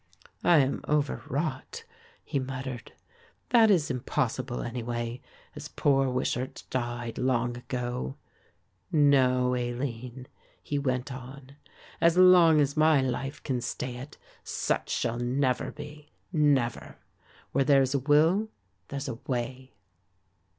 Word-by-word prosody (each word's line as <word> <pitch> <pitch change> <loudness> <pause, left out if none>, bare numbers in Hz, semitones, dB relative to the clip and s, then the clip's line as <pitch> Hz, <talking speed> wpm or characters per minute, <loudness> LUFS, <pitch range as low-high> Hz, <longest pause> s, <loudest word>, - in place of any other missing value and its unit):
"I 175 - +6
am 135 +1 -1
overwrought," 150 - -2 0.4
he 140 - -2
muttered; 130 -2 -6 0.6
"that 230 -3 +6
is 170 -8 +3
impossible 125 - -2
anyway, 120 0 -4 0.3
as - - -7
poor 135 -2 +2
Wishart 125 0 -2
died 120 -2 -3
long 125 -1 0
ago. 120 - -4 0.8
No, 130 -4 +4
Aline," 125 0 -4 0.4
he 145 - -2
went 130 -1 -2
on, 130 +1 -10 0.5
"as 170 +1 +4
long 180 -4 +7
as 140 -1 +1
my 155 -1 +5
life 130 +1 -3
can 130 -3 -2
stay 125 0 -4
it, 135 +4 -10 0.3
such - - -2
shall 120 0 -1
never 125 +1 0
be, 150 0 -11 0.2
never. 140 -7 +1 0.5
Where 135 - +2
there's 135 -2 +4
a 140 - +2
will, 160 - +3 0.4
there's 140 +1 -5
a 120 -3 -5
way." 130 +1 -4
130 Hz, 115 wpm, -28 LUFS, 125-145 Hz, 0.8 s, long